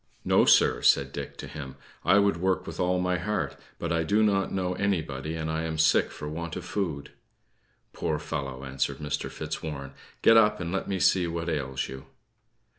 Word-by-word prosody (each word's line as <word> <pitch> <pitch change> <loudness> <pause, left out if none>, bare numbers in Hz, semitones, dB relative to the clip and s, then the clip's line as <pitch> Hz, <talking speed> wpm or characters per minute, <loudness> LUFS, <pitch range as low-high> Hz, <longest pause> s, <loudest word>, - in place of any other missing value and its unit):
"No, - - +4
sir," - - +5
said - - +4
Dick - - -6
to - - -7
him. 70 -4 -8 0.3
"I 100 - +5
would 100 -4 +3
work 95 +1 0
with - - -7
all 90 0 +2
my 90 0 0
heart; 105 +4 -2 0.2
but 85 - -3
I 85 0 +2
do 105 +7 +2
not 100 -2 +2
know 90 -1 -1
anybody, 80 -6 -2
and 80 -1 -3
I 80 0 -1
am 80 -1 -3
sick 80 - +4
for 75 - -7
want 85 +2 -5
of 90 - -6
food." 85 -8 -3 0.8
"Poor 75 - -1
fellow!" 70 -4 -5
answered 70 0 -2
Mr. 75 0 -3
Fitzwarren; 70 -3 -5 0.3
"get 115 - +7
up, 105 -1 +4
and 85 -2 -3
let 95 - -2
me 95 -1 -1
see 90 -1 +3
what 85 0 -3
ails 65 -4 -2
you." 65 0 -9
85 Hz, 190 wpm, -27 LUFS, 75-95 Hz, 0.8 s, get